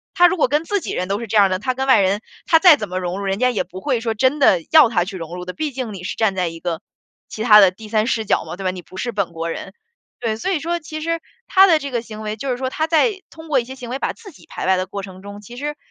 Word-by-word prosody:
他 355 - +7
如 370 - 0
果 - - +2
跟 295 +3 +1
自 405 +2 -1
己 - - -5
人 180 - -2
都 200 +2 -1
是 230 - -5
这 215 +1 0
样 200 -2 +6
的， 185 - -1
他 255 +5 -1
跟 265 +1 -3
外 260 - +6
人， 195 +2 +1 0.2
他 325 - +5
再 345 -2 +8
怎 210 -6 -5
么 185 +1 -2
融 180 +1 -3
入， - - -4
人 195 +1 -1
家 250 0 +3
也 230 - -1
不 185 +1 -10
会 255 -2 0
说 225 -1 -1
真 260 +6 +2
的 195 -10 +5
要 310 -6 +7
他 180 -6 +1
去 195 +1 -7
融 165 -1 -7
入 180 - -7
的， 180 - -6
毕 310 +5 -3
竟 250 -4 -5
你 185 -2 -8
是 185 - -5
站 215 -4 +1
在 180 -2 0
一 165 - -10
个 165 -2 -3 0.5
其 215 - -7
他 210 -2 +8
的 190 -2 +6
第 215 +4 -12
3 215 0 +1
视 225 -4 0
角 - - +1
嘛， - - -8
对 195 - -6
吧， 185 - +1
你 185 -1 -8
不 185 +3 -14
是 240 +4 -3
本 200 -4 -1
国 165 0 -4
人。 - - -6 0.5
对， 220 -2 -1
所 300 - -2
以 355 - 0
说 340 +3 -2
其 310 -1 -7
实 330 +1 -2 0.3
他 385 0 +6
的 330 -5 +4
这 280 -1 -6
个 240 -2 -1
行 220 -2 -9
为， 215 0 -4
就 265 +5 -5
是 245 - -2
说 260 0 -2
他 315 +4 -1
在 380 +5 +2
通 320 0 -13
过 280 -5 +2
一 - - -7
些 260 +3 -9
行 245 -2 -9
为， 255 - -2
把 - - -1
自 435 -4 -13
己 305 - -18
排 - - -5
外 190 - +4
的 185 0 -1
过 200 +2 -6
程 190 -1 -10
中， 200 +1 -9
其 210 +4 -12
实 295 +3 -4
225 Hz, 350 characters per minute, -20 LUFS, 190-290 Hz, 0.5 s, 再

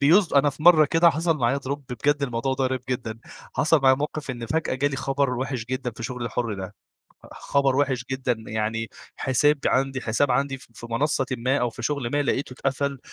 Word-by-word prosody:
بيص 170 +7 +4
أنا 140 +1 +4
في 145 +2 -11
مرة 160 -2 +8
كده 165 +3 +4
حصل 165 +1 0
معايا 125 +2 +1
drop 140 +1 -4
بجد 145 +4 0
الموضوع 125 0 -1
ده 130 0 -1
غريب 130 -1 -1
جدًا، 115 -3 -3 0.4
حصل 155 0 +3
معايا 130 -1 +6
موقِف 150 0 -4
إن 120 -2 -6
فجأة 160 +1 -1
جا 140 +2 +1
لي 135 - -4
خبر 135 0 0
وِحِش 130 -2 -3
جدًا 130 0 -3
في 115 0 -10
شُغلي 125 +1 -4
الحُر 115 -1 -2
ده، 95 +1 -7 0.6
خبر 140 -2 +1
وِحِش 130 -4 +1
جدًا 130 -1 0 0.2
يعني 110 +1 -2 0.3
حساب 145 +3 +2
عنْدي 135 0 +1
حساب 125 +5 +1
عنْدي 135 +2 0
ف - - -15
في 115 - -9
منصّةٍ 135 +2 +1
ما، 130 +4 +1
أو 125 -1 0
في 115 - -9
شغل 140 -5 -1
ما 145 0 +2
لقيتُه 135 -1 -1
اتقفل، 135 +1 -2
135 Hz, 205 wpm, -24 LUFS, 125-145 Hz, 0.6 s, مرة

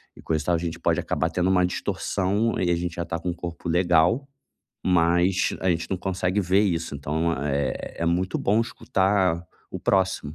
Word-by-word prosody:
e - - -13
coisa 80 -2 -1
e - - -15
tal. 85 - +2
A - - +2
gente 85 -1 -4
pode - - +1
acabar - - -1
tendo 90 +1 0
uma 90 -1 +4
distorção 100 +4 -1
e 90 - +1
a - - +3
gente 85 0 -3
já 85 - -2
está 85 -1 -4
com 90 - -3
um - - -1
corpo 85 0 -7
legal, 90 - +3 0.6
mas 90 +1 +2
a 95 - 0
gente 85 -1 -2
não 95 - 0
consegue 95 +1 -1
ver 95 +1 +3
isso, 85 -6 -1
então, 75 +4 -1
é 70 0 -2
é 85 - -1
muito 90 +3 0
bom 105 +3 +2
escutar 95 -6 0 0.3
o - - -6
próximo 95 -6 0
90 Hz, 205 wpm, -25 LUFS, 85-95 Hz, 0.6 s, uma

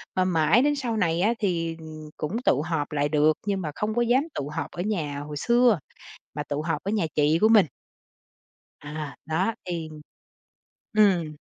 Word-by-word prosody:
mà 185 - +2
mãi 170 +4 +3
đến 290 +2 +2
sau 245 -5 -2
này 170 -3 +1
á, 220 +4 +3
thì, 165 -5 -1
ừm, 155 -1 -10
cũng 205 +11 -3
tụ 140 - +3
họp 160 -3 -2
lại 145 -1 0
được, 150 +1 +4
nhưng 195 -2 0
mà 155 - -3
không 215 +1 -2
có 240 - +2
dám 245 +4 +3
tụ 140 - -3
họp - - -4
ở 175 - -5
nhà 160 -8 -2
hồi 145 0 -6
xưa, 235 -2 +3 0.6
mà 150 - -2
tụ 145 +1 -3
họp 165 0 -2
ở 200 - -1
nhà 210 -6 +1
chị 150 +2 +3
của 220 - +5
mình. 215 -5 +6 1.1
À, 145 -1 -6
đó 185 +8 0
thì 170 -3 -4 1.0
ừm. 180 -8 +3
165 Hz, 190 wpm, -25 LUFS, 150-210 Hz, 1.1 s, mình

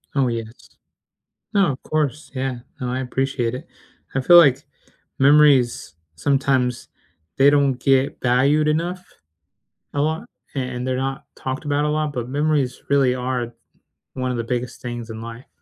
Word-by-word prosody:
Oh, 135 -2 +3
yes. 115 -1 -6 0.8
No, 195 -7 +3
of 130 - -8
course, 155 0 -2
yeah. 130 -2 -3 0.2
No, 125 -1 -3
I 130 - -2
appreciate 130 -2 -1
it. 130 - -9 0.5
I 135 - +1
feel 175 +6 +7
like 140 -4 +6 0.6
memories, 140 - +4 0.2
sometimes 130 - 0 0.5
they 140 +1 +6
don't 140 -2 +3
get 135 0 +2
valued 140 +5 +3
enough 170 +4 -1 0.9
a 145 - -1
lot, 155 +2 -1 0.3
and, 125 -2 -3
they're 130 0 0
not 135 +2 -3
talked 130 +3 -4
about 145 0 0
a - - +1
lot, 150 -1 -1
but 120 -2 -4
memories 145 -2 0
really 135 -3 +3
are 125 -1 -2
th 120 - -15 0.6
one 130 -1 -2
of 125 - -2
the 115 - -2
biggest 120 0 -4
things 120 -2 -6
in 110 0 -7
life. 115 +2 -9
130 Hz, 160 wpm, -21 LUFS, 125-145 Hz, 0.9 s, feel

